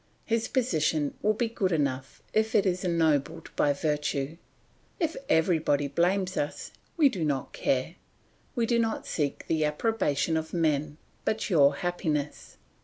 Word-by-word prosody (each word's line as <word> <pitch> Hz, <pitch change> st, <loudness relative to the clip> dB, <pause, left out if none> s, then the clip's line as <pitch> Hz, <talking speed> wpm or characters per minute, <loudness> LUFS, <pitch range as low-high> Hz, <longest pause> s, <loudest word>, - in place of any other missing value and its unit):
His 230 Hz, 0 st, 0 dB
position 155 Hz, -, +1 dB
will 215 Hz, +1 st, +2 dB
be 235 Hz, +2 st, 0 dB
good 200 Hz, -4 st, -1 dB
enough 135 Hz, -4 st, -2 dB
if 220 Hz, 0 st, +1 dB
it 205 Hz, -, +4 dB
is 185 Hz, 0 st, 0 dB
ennobled 165 Hz, -2 st, +1 dB
by 145 Hz, -, +3 dB
virtue. 145 Hz, 0 st, -1 dB, 0.6 s
If 330 Hz, -2 st, 0 dB
everybody 160 Hz, -3 st, +2 dB
blames 180 Hz, +5 st, +1 dB
us, 145 Hz, -, -3 dB, 0.3 s
we 310 Hz, -4 st, +6 dB
do 195 Hz, -11 st, -2 dB
not 140 Hz, -4 st, -1 dB
care. 135 Hz, +7 st, -1 dB, 0.6 s
We 235 Hz, -2 st, +1 dB
do 235 Hz, 0 st, +2 dB
not 225 Hz, -1 st, -1 dB
seek 145 Hz, -3 st, -2 dB
the 160 Hz, -1 st, +1 dB
approbation 160 Hz, -1 st, 0 dB
of 160 Hz, 0 st, -4 dB
men, 155 Hz, -3 st, 0 dB, 0.3 s
but 220 Hz, -1 st, -1 dB
your 140 Hz, -4 st, +5 dB
happiness." 155 Hz, -4 st, -3 dB
160 Hz, 145 wpm, -28 LUFS, 145-200 Hz, 0.6 s, we